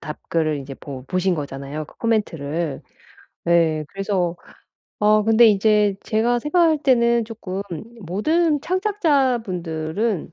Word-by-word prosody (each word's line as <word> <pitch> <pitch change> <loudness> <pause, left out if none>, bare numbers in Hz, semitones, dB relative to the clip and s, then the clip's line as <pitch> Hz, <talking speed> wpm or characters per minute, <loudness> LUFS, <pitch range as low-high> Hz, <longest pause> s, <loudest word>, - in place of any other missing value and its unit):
답글을 155 0 -2
이제 135 0 -8
보 135 -2 -9
보신 185 0 0
거잖아요 145 0 -5
그 - - -19
코멘트를. 165 - -1 0.7
예. 160 -3 +2
그래서 190 -3 -1 0.6
어 210 0 +4
근데 225 +2 +6
인제 210 -1 +3
제가 235 +3 +1
생각할 315 +3 +2
때는 235 -3 +3
조금 200 -4 -6 0.4
모든 295 - +1
창작자 335 - +1
분들은 170 +1 -3
200 Hz, 250 characters per minute, -21 LUFS, 160-235 Hz, 0.7 s, 근데